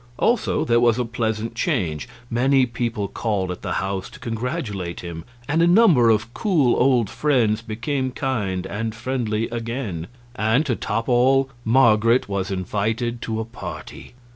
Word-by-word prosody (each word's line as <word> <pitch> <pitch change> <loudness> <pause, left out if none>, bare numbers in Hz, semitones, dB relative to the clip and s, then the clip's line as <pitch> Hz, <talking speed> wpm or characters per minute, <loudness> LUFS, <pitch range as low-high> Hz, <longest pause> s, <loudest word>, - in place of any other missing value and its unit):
Also, 235 -1 +1
there 120 0 +3
was 120 -1 +3
a 125 - 0
pleasant 115 -1 -2
change; 100 - -1 0.2
many 130 +3 +3
people 115 -3 -2
called 100 -3 -2
at 90 - -7
the 90 -3 -3
house 95 -1 -2
to - - -14
congratulate 115 - -4
him, 85 -2 -7 0.2
and 160 +3 +2
a 170 - +5
number 175 - +6
of 110 +2 +1
cool 160 - +2
old 125 -4 +3
friends 115 -5 +1
became 120 +5 -2
kind 105 -9 -2
and 110 +2 -4
friendly 115 -2 -2
again; 115 -7 -4 0.3
and, 110 +8 +2
to 125 -5 0
top 115 +2 -2
all, 135 +2 +3
Marget 115 0 +4
was 100 -1 -2
invited 110 +5 -2
to 110 -2 -3
a 110 - -2
party. 115 +1 -9
115 Hz, 155 wpm, -22 LUFS, 105-130 Hz, 0.3 s, number